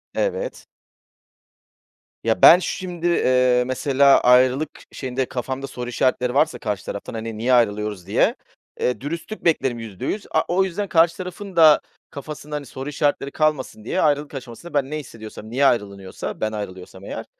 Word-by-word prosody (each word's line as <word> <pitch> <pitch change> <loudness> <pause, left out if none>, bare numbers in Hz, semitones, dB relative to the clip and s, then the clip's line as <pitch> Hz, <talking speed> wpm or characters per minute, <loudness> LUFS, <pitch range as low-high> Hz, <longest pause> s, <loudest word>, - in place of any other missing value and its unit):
Evet. - - -2 1.6
Ya, - - 0
ben 175 - +10
şimdi, 180 -2 -3
eee, 125 -6 +3
mesela, 135 +1 +4
ayrılık 130 +4 +4 0.2
şeyinde 130 0 -3
kafamda 130 +2 -4
soru 125 -2 -6
işaretleri 125 0 0
varsa 145 -2 +2
karşı 105 -5 -3
taraftan, 100 - -6
hani, 115 -1 -5
"Niye 125 +3 +1
ayrılıyoruz?" 105 -5 +1
diye, 100 - +2 0.4
eee, 125 - -1
dürüstlük 165 +9 -6
beklerim 135 -7 +1
%100. 115 - -5
A - - +3
o 180 +2 +2
yüzden 190 +2 -3
karşı 165 -1 +3
tarafın 185 +1 -7
da 160 -3 +7 0.3
kafasında, 150 +1 -7
hani, 145 -1 -4
soru 135 +2 -7
işaretleri 145 -1 0
kalmasın 150 -8 -1
diye, 185 - 0
ayrılık 145 -1 +1
aşamasında 135 +5 -9
ben 140 -2 +1
ne 155 - -2
hissediyorsam, 110 -4 -10
niye 135 +4 +1
ayrılınıyorsa, 100 -6 -2
ben 110 - 0
ayrılıyorsam 95 -3 -7
eğer - - -6
135 Hz, 150 wpm, -22 LUFS, 115-155 Hz, 1.6 s, ben